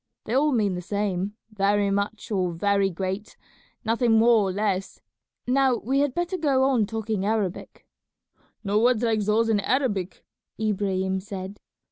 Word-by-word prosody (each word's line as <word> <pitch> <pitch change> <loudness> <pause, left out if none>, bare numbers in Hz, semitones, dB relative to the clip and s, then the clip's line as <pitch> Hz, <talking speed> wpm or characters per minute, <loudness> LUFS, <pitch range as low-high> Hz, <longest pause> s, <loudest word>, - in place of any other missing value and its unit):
They 220 - -3
all 295 +3 +3
mean 210 -6 +1
the 180 - -4
same, 200 +1 -2 0.2
'very 200 0 +1
much' 200 +2 -2
or 185 -4 0
'very 200 +3 +1
great,' 190 +3 -5 0.5
nothing 230 +1 +2
more 225 -3 +4
or - - -1
less. 195 -1 -2 0.5
Now 260 0 +3
we 265 +5 -1
had 285 -2 0
better 350 +1 -2
go 275 -4 +2
on 255 -6 +2
talking 220 -2 -3
Arabic." 205 -3 -2 0.8
"No 205 0 +1
words 240 0 +3
like 225 -2 +2
those 215 +3 +2
in 220 -2 +2
Arabic," 205 -6 -1 0.3
Ibrahim 190 -3 0
said. 195 0 -7
210 Hz, 150 wpm, -25 LUFS, 195-235 Hz, 0.8 s, more